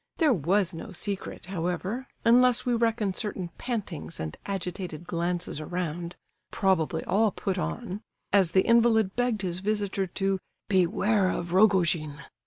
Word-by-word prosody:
There 310 -5 +4
was 185 - +2
no 165 - -7
secret, 195 0 -4
however, 185 +7 -3 0.2
unless 250 +1 +5
we 245 - +1
reckon 225 -4 +1
certain 190 -4 -3
pantings 200 - -4
and 80 -1 -4
agitated 180 -3 -4
glances 170 -2 -2
around 170 +1 -4 0.3
(probably 165 -4 +1
all 210 +4 +3
put 190 -1 -3
on) 205 0 -4 0.3
as 195 -4 +5
the 190 +2 +3
invalid 225 -4 +4
begged 245 -4 0
his 180 -1 -2
visitor 200 -1 -1
to 195 +1 -1 0.3
"beware 190 +1 +2
of 175 -1 -3
Rogojin." 175 -7 +3
190 Hz, 135 wpm, -27 LUFS, 175-215 Hz, 0.3 s, unless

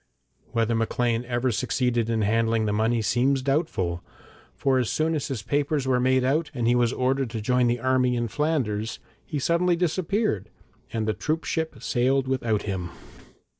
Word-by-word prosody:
Whether 115 0 +1
Maclean 115 +1 0
ever 120 +1 0
succeeded 120 0 0
in 110 -2 +1
handling 115 +1 +2
the 105 - 0
money 110 +2 +1
seems 130 +5 +2
doubtful, 95 - 0 0.5
for 135 -1 +2
as 120 -3 0
soon 155 +6 0
as 150 -4 -2
his 125 -7 -4
papers 145 +2 0
were 125 -1 +3
made 130 +1 +3
out 150 +5 +1
and 120 -3 -1
he 120 - +4
was 120 -1 +2
ordered 130 0 0
to 115 -1 -4
join 125 +3 +2
the 120 +1 +1
army 130 0 +2
in 120 -1 -1
Flanders, 115 -6 -1 0.3
he 155 - -4
suddenly 170 +5 +2
disappeared, 180 - 0 0.4
and 110 -1 -2
the 110 - +1
troopship 160 +2 -2
sailed 130 +1 +1
without 120 -5 0
him. 95 -4 -3
125 Hz, 170 wpm, -25 LUFS, 115-140 Hz, 0.5 s, he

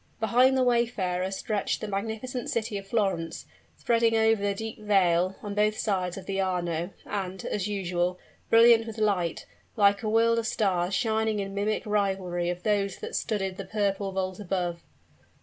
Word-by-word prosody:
Behind 250 +4 +4
the 260 - +3
wayfarer 215 -7 +1
stretched 200 +1 -2
the 215 - -5
magnificent 220 +5 -4
city 225 -1 -2
of 195 - -13
Florence, 195 -7 -1 0.3
spreading 230 -1 +2
over 220 -1 +3
the 200 0 0
deep 220 +2 -6
vale, 185 -3 +2
on 205 -1 -4
both 210 +1 +1
sides 185 -4 -1
of 190 - -8
the 195 0 -1
Arno, 175 -2 -1 0.2
and, 190 -2 -4
as 205 -1 -2
usual, 180 -3 -1 0.3
brilliant 230 0 +6
with 225 0 -7
light, 195 -6 0 0.3
like 200 -2 +4
a 215 - -2
world 230 +1 +3
of 225 - -2
stars 190 -3 0
shining 220 -1 +1
in 195 -1 -3
mimic 205 +2 -1
rivalry 190 -4 0
of 175 0 -4
those 200 -2 0
that - - -7
studded 195 -4 -2
the 195 - -5
purple 200 -2 -1
vault 185 0 -3
above. 175 -3 -2
200 Hz, 165 wpm, -27 LUFS, 185-220 Hz, 0.3 s, brilliant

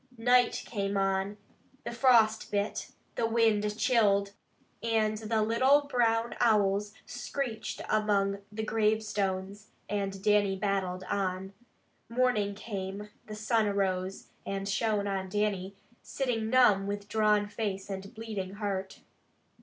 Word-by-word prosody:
Night 245 +1 +3
came 200 -3 -2
on, 195 +1 0 0.5
the - - -4
frost 235 -3 +4
bit, 205 0 -2 0.2
the 230 - 0
wind 220 -2 +2
chilled, 200 -5 +3 0.5
and 215 -2 +1
the 220 0 0
little 260 +6 +4
brown 235 -4 +1
owls 205 -2 +3
screeched 245 -6 -4
among 200 -2 +1
the 220 +1 -4
gravestones, 210 -2 -1 0.2
and 195 -2 -3
Dannie 205 -2 +3
battled 190 -2 -1
on. 190 0 -2 0.6
Morning 230 -5 +1
came, 200 -1 -6 0.2
the 215 - -6
sun 220 0 +1
arose, 190 -1 -1
and 195 0 -4
shone 205 +1 0
on 190 -1 -2
Dannie, 200 -1 -1 0.3
sitting 235 -5 -2
numb 215 -6 +5
with 205 0 -4
drawn 210 -1 +2
face 205 -3 -3
and 195 0 -6
bleeding 210 -4 -5
heart. 195 -2 -4
210 Hz, 120 wpm, -30 LUFS, 195-225 Hz, 0.6 s, numb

